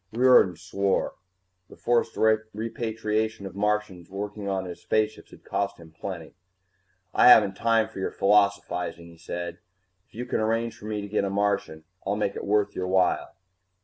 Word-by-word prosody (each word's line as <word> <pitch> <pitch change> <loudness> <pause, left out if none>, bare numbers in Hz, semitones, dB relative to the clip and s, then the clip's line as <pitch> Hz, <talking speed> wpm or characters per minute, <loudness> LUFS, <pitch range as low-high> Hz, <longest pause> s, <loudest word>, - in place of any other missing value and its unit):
Riordan 120 -6 +5
swore. 95 +3 -1 0.6
The - - -14
forced 120 -1 +1
repatriation 110 -1 -1
of 95 - -7
Martians 105 -3 -1
working 100 +1 -5
on 95 -1 -1
his 90 -1 -8
spaceships 110 0 -1
had - - -16
cost 100 0 -2
him 80 -2 -14
plenty. 85 0 -7 0.8
"I - - +6
haven't 105 -5 +8
time 115 0 +2
for - - -10
your 95 - -1
philosophizing," 100 -4 +1
he 85 0 -14
said. 85 +1 -5 0.5
"If - - -25
you 120 +2 -4
can - - -1
arrange 115 +1 0
for - - -13
me 105 -1 -3
to 100 - -6
get 105 0 0
a 100 - -1
Martian, 100 -5 -1 0.2
I'll 100 +1 -1
make 105 -1 -1
it - - -5
worth 105 0 +1
your 90 - -2
while." 95 0 +1
100 Hz, 170 wpm, -26 LUFS, 95-110 Hz, 0.8 s, haven't